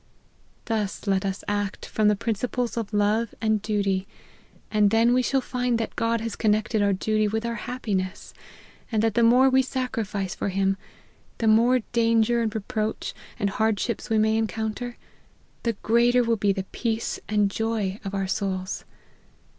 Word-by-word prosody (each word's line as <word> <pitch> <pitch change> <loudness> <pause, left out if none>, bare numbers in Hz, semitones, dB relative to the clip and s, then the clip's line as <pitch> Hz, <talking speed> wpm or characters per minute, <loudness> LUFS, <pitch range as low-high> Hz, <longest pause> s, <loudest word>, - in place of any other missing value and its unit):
Thus 210 -3 -2
let 195 -1 +1
us 195 0 -4
act 205 -1 -2
from 215 -1 +1
the 210 - +4
principles 235 +3 -2
of 225 -3 -3
love 210 +2 +1
and 220 -2 +1
duty, 200 -2 0 0.6
and 210 -1 +4
then 225 +3 +4
we 255 - +4
shall 265 +1 +1
find 250 -1 -1
that 225 - -3
God 230 -1 0
has 225 -1 -3
connect 215 0 +1
ed 215 - +3
our 200 0 +3
duty 215 +2 +1
with 220 +2 -2
our 235 - -1 0.2
happiness, 200 -7 -3 0.6
and 220 -1 +1
that 225 -2 +2
the 235 - +2
more 245 +3 +6
we 265 0 +5
sacrifice 225 -7 -3
for - - -2
him 195 0 +1 0.6
the 230 - -2
more* 235 +3 +5
danger 230 0 +3
and 225 -1 -1
re 220 - -1
proach, 220 -3 -2 0.2
and 200 -1 0
hardships 220 +2 -1
we 220 - +2
may 220 +1 +3
encounter, 220 +2 -3 0.6
the 230 - 0
greater 240 +2 +4
will 230 0 +2
be 205 -1 +2
the 190 -1 -3
peace 225 -1 -2
and 205 -1 +2
joy 220 -3 -1
of 200 -1 -4
our 195 -1 0
souls. 190 -1 -2
220 Hz, 170 wpm, -25 LUFS, 205-230 Hz, 0.6 s, more